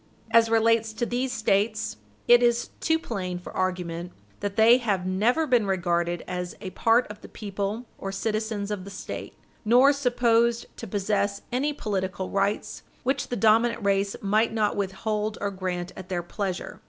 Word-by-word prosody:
As 230 Hz, 0 st, +5 dB
relates 225 Hz, 0 st, +3 dB
to 220 Hz, +2 st, -1 dB
these 250 Hz, +2 st, -1 dB
States, 215 Hz, -, 0 dB, 0.3 s
it 240 Hz, 0 st, +7 dB
is 240 Hz, 0 st, +2 dB
too 320 Hz, 0 st, +2 dB
plain 190 Hz, -, -4 dB
for 180 Hz, -, -10 dB
argument 180 Hz, -2 st, -2 dB, 0.3 s
that 200 Hz, -1 st, -3 dB
they 230 Hz, +3 st, +6 dB
have 200 Hz, -7 st, -1 dB
never 220 Hz, +12 st, +2 dB
been 245 Hz, -7 st, +2 dB
regarded 175 Hz, -2 st, 0 dB
as 180 Hz, 0 st, -4 dB
a 190 Hz, -2 st, -6 dB
part 230 Hz, +5 st, +3 dB
of 210 Hz, -, -12 dB
the -, -, -11 dB
people 205 Hz, +2 st, -4 dB
or 195 Hz, -, -4 dB
citizens 215 Hz, 0 st, -2 dB
of 200 Hz, -3 st, -3 dB
the 200 Hz, -, -9 dB
State, 195 Hz, -, -7 dB, 0.3 s
nor 250 Hz, +6 st, +6 dB
supposed 235 Hz, -3 st, +2 dB
to 230 Hz, -, -7 dB
possess 200 Hz, 0 st, -1 dB
any 270 Hz, +5 st, +1 dB
political 190 Hz, -7 st, -3 dB
rights 200 Hz, +1 st, -1 dB, 0.2 s
which 270 Hz, +1 st, 0 dB
the 245 Hz, -, -3 dB
dominant 225 Hz, +1 st, +3 dB
race 200 Hz, 0 st, +1 dB
might 215 Hz, +3 st, +2 dB
not 215 Hz, -2 st, +1 dB
withhold 210 Hz, +2 st, -2 dB
or 200 Hz, 0 st, -2 dB
grant 185 Hz, -2 st, -4 dB
at 185 Hz, -1 st, -10 dB
their 175 Hz, -2 st, -2 dB
pleasure. 185 Hz, 0 st, -4 dB
210 Hz, 165 wpm, -26 LUFS, 190-230 Hz, 0.3 s, it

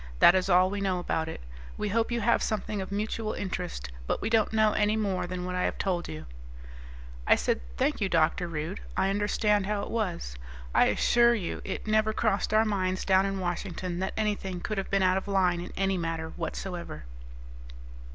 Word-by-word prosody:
That 175 Hz, -, +8 dB
is 185 Hz, 0 st, +1 dB
all 185 Hz, +1 st, +5 dB
we 205 Hz, 0 st, -3 dB
know 190 Hz, -2 st, +1 dB
about 160 Hz, -2 st, -1 dB
it. -, -, -7 dB, 0.4 s
We 210 Hz, -, -2 dB
hope 230 Hz, +3 st, +1 dB
you 235 Hz, -1 st, 0 dB
have 235 Hz, +2 st, +3 dB
something 210 Hz, -1 st, -2 dB
of 190 Hz, -, -6 dB
mutual 215 Hz, +2 st, -2 dB
interest, 180 Hz, -, -4 dB, 0.2 s
but -, -, 0 dB
we 215 Hz, -, -3 dB
don't 220 Hz, -2 st, +3 dB
know 220 Hz, -1 st, +4 dB
any 210 Hz, +1 st, +2 dB
more 195 Hz, -4 st, -1 dB
than 180 Hz, 0 st, -4 dB
what 180 Hz, -, -3 dB
I 180 Hz, -, -1 dB
have -, -, -2 dB
told 180 Hz, -3 st, -1 dB
you." 80 Hz, 0 st, -7 dB, 1.0 s
I -, -, +7 dB
said, -, -, 0 dB, 0.2 s
"Thank 150 Hz, -, +1 dB
you, 195 Hz, -, +1 dB
Dr. 165 Hz, +1 st, +2 dB
Rude. 165 Hz, +4 st, -4 dB, 0.2 s
I 195 Hz, -, +2 dB
understand 205 Hz, 0 st, +1 dB
how 205 Hz, -1 st, -1 dB
it -, -, -6 dB
was. 180 Hz, -, -2 dB, 0.4 s
I -, -, +5 dB
assure 235 Hz, 0 st, +4 dB
you 190 Hz, -7 st, -4 dB
it 190 Hz, -, -5 dB
never 215 Hz, 0 st, +2 dB
crossed 215 Hz, -3 st, 0 dB
our 215 Hz, +1 st, +4 dB
minds 185 Hz, -3 st, -1 dB
down 190 Hz, 0 st, +4 dB
in 195 Hz, 0 st, -2 dB
Washington 175 Hz, 0 st, -3 dB
that 190 Hz, +1 st, -2 dB
anything 205 Hz, -4 st, -1 dB
could 210 Hz, +3 st, -2 dB
have 195 Hz, -, -4 dB
been 195 Hz, -1 st, +2 dB
out 185 Hz, 0 st, +4 dB
of 190 Hz, -, -4 dB
line 185 Hz, -3 st, +2 dB
in 175 Hz, -, -7 dB
any 195 Hz, -1 st, +1 dB
manner 165 Hz, -1 st, -3 dB
whatsoever." 170 Hz, -, -5 dB
190 Hz, 200 wpm, -28 LUFS, 180-210 Hz, 1.0 s, That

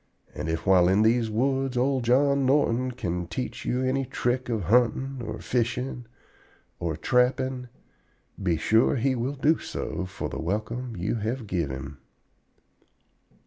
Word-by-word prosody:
And 80 Hz, -, -4 dB
if 80 Hz, 0 st, -2 dB
while 90 Hz, -2 st, +5 dB
in 95 Hz, +4 st, +4 dB
these 115 Hz, 0 st, +3 dB
woods 130 Hz, +3 st, 0 dB
old 130 Hz, 0 st, +1 dB
John 140 Hz, +3 st, +3 dB
Norton 130 Hz, -2 st, +2 dB
can 90 Hz, -8 st, -3 dB
teach 90 Hz, +9 st, -5 dB
you 125 Hz, +1 st, 0 dB
any 130 Hz, +1 st, +1 dB
trick 125 Hz, 0 st, -1 dB
of 110 Hz, -4 st, -1 dB
huntin' 125 Hz, +6 st, +2 dB
or 110 Hz, -, -4 dB
of -, -, -11 dB
fishin' 125 Hz, 0 st, -1 dB, 0.7 s
or 85 Hz, -2 st, -1 dB
of 80 Hz, -, -9 dB
trappin', 125 Hz, 0 st, +1 dB, 0.7 s
be 90 Hz, -4 st, +1 dB
sure 110 Hz, -, +3 dB
he 135 Hz, +2 st, +1 dB
will 130 Hz, +3 st, -2 dB
do 150 Hz, +4 st, +2 dB
so 95 Hz, -, -4 dB
for -, -, -5 dB
the -, -, -5 dB
welcome 110 Hz, +7 st, -3 dB
you 95 Hz, +7 st, -1 dB
have 115 Hz, +3 st, -3 dB
give 85 Hz, -7 st, -1 dB
him." 70 Hz, +2 st, -7 dB
120 Hz, 155 wpm, -26 LUFS, 95-130 Hz, 0.7 s, while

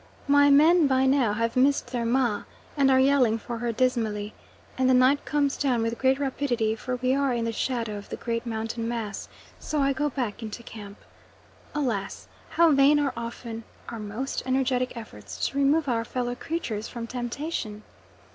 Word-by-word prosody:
My 285 Hz, 0 st, +5 dB
men, 310 Hz, +3 st, +6 dB
by 265 Hz, -1 st, +2 dB
now, 260 Hz, -5 st, +3 dB
have 230 Hz, +2 st, -1 dB
missed 260 Hz, -1 st, +2 dB
their 240 Hz, -2 st, -2 dB
"ma" 235 Hz, -3 st, +1 dB, 0.3 s
and 275 Hz, -2 st, +3 dB
are 260 Hz, 0 st, +5 dB
yelling 260 Hz, -4 st, +4 dB
for 230 Hz, +1 st, -6 dB
her 240 Hz, 0 st, -1 dB
dismally, 220 Hz, -4 st, -1 dB, 0.4 s
and 260 Hz, 0 st, +2 dB
the 260 Hz, -, +5 dB
night 260 Hz, +3 st, +4 dB
comes 285 Hz, -2 st, +1 dB
down 250 Hz, -5 st, +1 dB
with 230 Hz, 0 st, -2 dB
great 265 Hz, 0 st, +3 dB
rapidity 255 Hz, -5 st, -1 dB
for 250 Hz, +3 st, -4 dB
we 255 Hz, +1 st, 0 dB
are 275 Hz, -1 st, +1 dB
in 230 Hz, -1 st, -1 dB
the 230 Hz, -, -1 dB
shadow 230 Hz, -3 st, -2 dB
of 200 Hz, -, -13 dB
the -, -, -4 dB
great 230 Hz, -1 st, -3 dB
mountain 225 Hz, 0 st, -3 dB
mass, 230 Hz, -3 st, -4 dB, 0.3 s
so 305 Hz, -, -2 dB
I 275 Hz, 0 st, +2 dB
go 295 Hz, +2 st, 0 dB
back 245 Hz, -6 st, -3 dB
into 225 Hz, +1 st, -7 dB
camp. 205 Hz, -3 st, -10 dB, 0.8 s
Alas! 235 Hz, -10 st, -2 dB, 0.2 s
how 335 Hz, -1 st, +4 dB
vain 280 Hz, +1 st, +5 dB
are 280 Hz, -3 st, 0 dB
often 230 Hz, -1 st, -6 dB, 0.3 s
our 230 Hz, -, -6 dB
most 215 Hz, +6 st, -4 dB
energetic 255 Hz, -1 st, 0 dB
efforts 105 Hz, -, -5 dB
to 275 Hz, -, -7 dB
remove 285 Hz, +2 st, +3 dB
our 230 Hz, -3 st, 0 dB
fellow 245 Hz, +1 st, -3 dB
creatures 245 Hz, -7 st, -4 dB
from 235 Hz, -1 st, -6 dB
temptation. 240 Hz, -2 st, -4 dB
245 Hz, 180 wpm, -26 LUFS, 230-275 Hz, 0.8 s, men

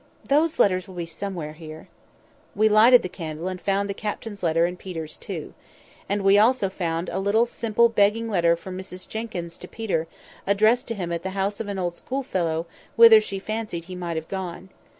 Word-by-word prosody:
those 305 Hz, +3 st, +3 dB
letters 185 Hz, -2 st, +2 dB
will 190 Hz, -, -11 dB
be 175 Hz, -1 st, -3 dB
somewhere 165 Hz, -2 st, -5 dB
here." 155 Hz, 0 st, -11 dB, 0.7 s
We 215 Hz, +1 st, +4 dB
lighted 225 Hz, +4 st, +6 dB
the -, -, -2 dB
candle, 165 Hz, -2 st, -6 dB
and 185 Hz, -1 st, -5 dB
found 200 Hz, 0 st, 0 dB
the 200 Hz, -, -3 dB
captain's 210 Hz, 0 st, -5 dB
letter 165 Hz, 0 st, +2 dB
and 180 Hz, +1 st, -4 dB
Peter's 165 Hz, -5 st, -6 dB
too. -, -, -7 dB, 0.6 s
And 200 Hz, 0 st, 0 dB
we 195 Hz, +1 st, +6 dB
also 220 Hz, -3 st, +3 dB
found 170 Hz, -2 st, -2 dB
a -, -, -2 dB
little 205 Hz, +4 st, +3 dB
simple 235 Hz, -1 st, +2 dB
begging 225 Hz, +1 st, +2 dB
letter 170 Hz, -5 st, +3 dB
from 185 Hz, +2 st, -8 dB
Mrs 185 Hz, -1 st, -8 dB
Jenkyns 190 Hz, -7 st, -5 dB
to 180 Hz, -, -9 dB
Peter, 180 Hz, -8 st, -2 dB, 0.4 s
addressed 215 Hz, +5 st, +3 dB
to 230 Hz, -, -3 dB
him 175 Hz, -4 st, -4 dB
at 170 Hz, -1 st, -2 dB
the 190 Hz, -, -4 dB
house 200 Hz, +1 st, -1 dB
of 225 Hz, -, -4 dB
an 200 Hz, -1 st, -4 dB
old 175 Hz, -2 st, -1 dB
schoolfellow 175 Hz, -10 st, -2 dB, 0.3 s
whither 230 Hz, -1 st, +9 dB
she 200 Hz, -2 st, -5 dB
fancied 215 Hz, -4 st, -4 dB
he 185 Hz, +1 st, -8 dB
might 170 Hz, -2 st, -4 dB
have 160 Hz, 0 st, -5 dB
gone. 190 Hz, -1 st, -6 dB
190 Hz, 195 wpm, -24 LUFS, 170-215 Hz, 0.7 s, whither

